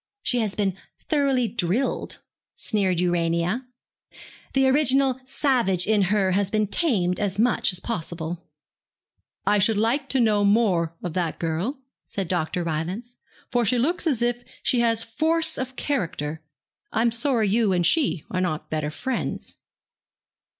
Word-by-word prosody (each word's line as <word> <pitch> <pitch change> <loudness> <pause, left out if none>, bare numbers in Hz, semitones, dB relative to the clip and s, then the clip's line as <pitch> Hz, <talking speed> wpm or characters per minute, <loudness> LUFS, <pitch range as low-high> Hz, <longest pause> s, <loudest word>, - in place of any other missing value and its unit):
'She 245 - +2
has 215 -3 -1
been 195 -3 0 0.2
thoroughly 275 -5 +1
drilled,' 210 +4 -1 0.4
sneered 190 -6 +1
Urania. 175 +6 0 0.9
'The 270 0 +4
original 265 -1 +3
savage 240 - +1
in 215 0 +3
her 195 0 +2
has 195 +1 +1
been 215 0 +1
tamed 195 - 0
as 200 -2 -1
much 235 0 +2
as 180 - -1
possible.' 170 -5 -4 1.0
'I 210 - +3
should 210 +2 +3
like 245 +6 +1
to 270 - +2
know 215 -3 +3
more 195 -6 +2
of 175 - -3
that 175 -2 -1
girl,' 170 - -2 0.3
said 195 -3 -3
Dr. 175 0 -1
Rylance, 180 +10 -4 0.3
'for 245 -1 +2
she 240 +3 +2
looks 330 +8 0
as 250 -7 +1
if 240 0 -1 0.2
she 245 - +2
has 230 -1 +2
force 320 +7 +1
of 260 0 -4
character. 165 - -2 0.5
I'm 230 +1 +2
sorry 235 -1 +2
you 220 0 +2
and 175 -2 +2
she 240 - +2
are 185 - 0
not 155 -4 -3
better 155 -1 -1
friends.' 255 +11 -4
215 Hz, 145 wpm, -24 LUFS, 180-250 Hz, 1.0 s, The